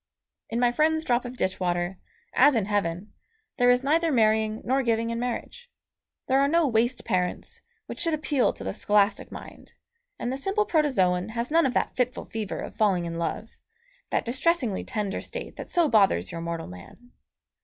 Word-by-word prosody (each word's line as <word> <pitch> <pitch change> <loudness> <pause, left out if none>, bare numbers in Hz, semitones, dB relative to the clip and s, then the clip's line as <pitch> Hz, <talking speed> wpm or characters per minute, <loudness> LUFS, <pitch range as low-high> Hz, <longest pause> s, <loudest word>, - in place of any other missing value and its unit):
In 230 - -2
my 245 -1 +3
friend's 315 +4 +2
drop 245 -3 +1
of 245 +1 -6
ditch 190 -4 -1
water, 175 0 -1 0.3
as 280 +1 +5
in 220 -4 +1
heaven, 200 -1 -2 0.4
there 245 0 +4
is 245 +1 +4
neither 325 +4 +2
marrying 220 -2 +2
nor 265 +3 +2
giving 230 -2 0
in 230 - -3
marriage. 250 - -5 0.6
There 265 +1 +2
are 280 - +4
no 330 +1 +3
waste 240 +1 0
parents, 180 -4 -2 0.2
which - - -8
should 330 -2 +1
appeal 295 -4 +1
to - - -9
the 95 0 -3
scholastic 205 0 +1
mind, - - -11 0.4
and 245 - -3
the 265 - -4
simple 400 +7 0
protozoon 220 - +1
has 235 +3 -3
none 330 -2 +4
of 250 - -4
that - - 0
fitful 250 0 -1
fever 220 -3 -4
of - - -7
falling 190 -5 +2
in 170 0 -4
love, 190 +6 -3 0.6
that - - 0
distressingly 255 - 0
tender 210 -2 -3
state - - -7
that - - -7
so 345 -2 +3
bothers 210 -8 +3
your 165 -1 -5
mortal 170 -1 -4
man. 90 - -13
235 Hz, 185 wpm, -26 LUFS, 195-275 Hz, 0.6 s, as